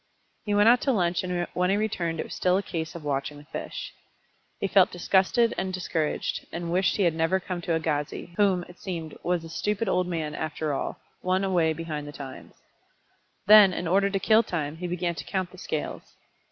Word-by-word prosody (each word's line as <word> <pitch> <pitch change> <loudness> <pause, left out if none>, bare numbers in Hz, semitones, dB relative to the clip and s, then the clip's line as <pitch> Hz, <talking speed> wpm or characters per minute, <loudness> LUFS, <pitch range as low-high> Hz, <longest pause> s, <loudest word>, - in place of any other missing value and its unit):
He 205 -1 0
went 205 +1 +5
out 245 +1 +6
to 275 - +2
lunch 180 -6 +1
and 180 -1 -1
when 180 0 +1
he 195 - +3
returned 180 -7 -1
it - - 0
was - - -9
still 180 0 +2
a 200 - -1
case 160 -3 -4
of 170 - -7
watching 145 0 -2
the 145 - -12
fish. 150 - -6 0.7
He - - -1
felt 195 -1 +5
disgusted 195 +6 +2
and 190 - -2
discouraged, 170 -4 -2
and 170 0 -4
wished 185 +1 +2
he 200 - +2
had 170 -3 +3
never 165 +4 +1
come 180 -1 -5
to 170 -1 0
Agassiz, 155 0 -2
whom, 190 -3 +3
it 180 - -15
seemed, 165 -5 -5
was 175 -1 0
a 165 - -9
stupid 210 +6 -1
old 180 -1 +1
man 160 -4 -3
after 155 -1 -3
all, - - -3 0.2
one 185 +1 +1
away 175 -4 +2
behind 155 -2 -4
the - - -6
times. 135 -3 -10 0.9
Then, 205 -2 +8
in 175 0 -3
order 195 +3 +3
to 195 0 -1
kill 220 +3 +5
time, 160 -8 -3
he 180 +1 -4
began 175 0 -1
to - - -7
count 185 -2 -3
the 185 - -13
scales. 155 - -3
180 Hz, 210 wpm, -27 LUFS, 160-190 Hz, 0.9 s, Then